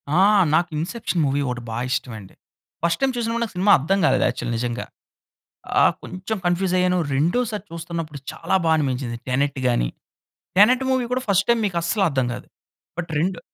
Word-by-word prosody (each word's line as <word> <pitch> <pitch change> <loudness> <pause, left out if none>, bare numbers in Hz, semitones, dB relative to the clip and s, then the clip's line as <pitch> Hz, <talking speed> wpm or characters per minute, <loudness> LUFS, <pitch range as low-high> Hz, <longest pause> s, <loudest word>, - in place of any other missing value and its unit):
ఆ! - - +4 0.4
నాకు 175 +1 +2
'Inception' 175 0 -2
movie 140 +1 0
ఒకటి 125 -1 -3
బా 115 - -4
ఇష్టం 130 -1 -2
అండి. 95 -2 -14 0.5
ఫస్ట్ 170 - +1
టైమ్ 270 -1 +2
చూసినప్పుడు, 235 0 -1
నాకు 225 - -5
సినిమా 195 +3 +3
అర్థం 190 +8 +1
కాలేదు, 130 -2 +3
యాక్చువల్ 120 0 -4
నిజంగా. 120 0 -3 1.0
ఆహ్, - - +5
కొంచెం 185 +4 -5
కన్ఫ్యూజ్ 175 +1 +1
అయ్యాను. 180 0 +2 0.2
రెండోసారి 210 - 0
చూస్తున్నప్పుడు 165 -3 -5
చాలా 165 +3 -2
బా 160 - +3
అనిపించింది 130 -4 -2
'టెనెట్' 135 +1 0
గాని. 120 - +1 0.7
'టెనెట్' 250 +6 +5
మూవీ 260 -2 +1
కూడా 255 0 -1
ఫస్ట్ 200 0 +3
టైమ్ 235 -1 +4
మీకు 175 -3 -4
అస్సలు 195 +3 +1
అర్థం 130 -3 0
కాదు. - - -9 0.5
బట్ 170 -1 -4
రెండు 180 +2 -1
170 Hz, 175 wpm, -22 LUFS, 135-200 Hz, 1.0 s, ఆహ్